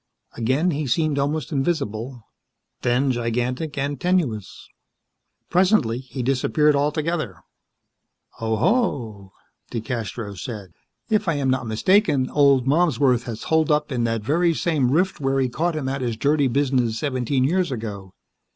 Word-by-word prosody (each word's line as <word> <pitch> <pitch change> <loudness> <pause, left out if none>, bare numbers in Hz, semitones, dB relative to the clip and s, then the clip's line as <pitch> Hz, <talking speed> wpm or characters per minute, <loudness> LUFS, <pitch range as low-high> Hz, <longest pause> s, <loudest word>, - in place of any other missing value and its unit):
Again 130 +10 +1
he 150 -1 -2
seemed 155 +2 +1
almost 150 +3 -1
invisible; 135 -5 -2 0.6
then 125 +3 +2
gigantic 125 +5 -2
and 140 -1 -2
tenuous. 145 - -1 0.8
Presently 175 - +3
he 130 0 -6
disappeared 145 +3 +2
altogether. 150 - -1 1.0
"Oho!" 115 - 0 0.4
DeCastros 110 -4 -4
said, 105 -7 -7 0.4
"If 215 -2 +2
I 165 - +2
am 135 -2 +1
not 130 -2 -1
mistaken, 140 - +2
old 140 -3 +4
Malmsworth 135 -5 +2
has 115 -2 -6
holed 160 -1 +2
up 150 0 +1
in 120 -2 0
that 115 -2 -1
very 165 +7 +2
same 150 -8 +1
rift 180 +7 +1
where 135 -1 0
we 135 -2 +1
caught 165 +6 -1
him 145 -4 -3
at 135 0 -2
his 120 -3 -2
dirty 145 +3 +2
business 125 -3 +1
seventeen 130 -1 0
years 175 +3 +1
ago. 105 -5 -6
135 Hz, 135 wpm, -23 LUFS, 120-155 Hz, 1.0 s, old